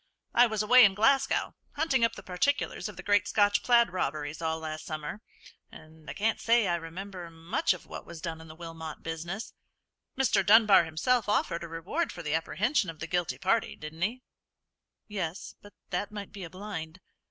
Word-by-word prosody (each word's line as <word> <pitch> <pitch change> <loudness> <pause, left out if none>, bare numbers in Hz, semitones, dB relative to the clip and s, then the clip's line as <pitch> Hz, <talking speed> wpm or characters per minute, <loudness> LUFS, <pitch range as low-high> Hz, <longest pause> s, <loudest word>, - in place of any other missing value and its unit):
"I 245 +1 +6
was 220 -2 -1
away 250 +4 +8
in 195 -2 +5
Glasgow, 270 +6 +2 0.2
hunting 285 -5 +1
up 230 - +2
the - - -10
particulars 220 +5 -1
of 200 - -11
the - - -8
great 205 +1 +3
Scotch 205 -2 +3
plaid 235 -4 +4
robberies, 150 -3 -3
all 160 -1 -1
last 155 -1 -6
summer, 155 +5 -5 0.5
and 155 -1 -14
I - - -4
can't 220 +2 0
say 230 -2 +3
I 175 - +1
remember 175 +2 -6
much 165 +4 -1
of 180 - -14
what - - -8
was 170 -1 -10
done 160 -1 -5
in 160 - -12
the 155 - -11
Wilmot 165 -2 -8
business. 170 +6 -5 0.6
Mr. 265 -1 +3
Dunbar 210 -4 +7
himself 205 +9 +1
offered 170 -5 0
a - - -5
reward 170 - -2
for 170 - -8
the 150 -1 -2
apprehension 200 - +1
of 165 - -7
the 165 - -5
guilty 175 0 -1
party, 220 +5 +1
didn't 155 +2 -9
he?" 235 +7 -1 0.8
"Yes; 190 -4 -4
but 205 - -15 0.2
that 195 +3 -2
might 205 -2 -7
be 200 -3 -8
a 170 - -7
blind." 185 -3 -7
185 Hz, 190 wpm, -29 LUFS, 165-215 Hz, 0.8 s, away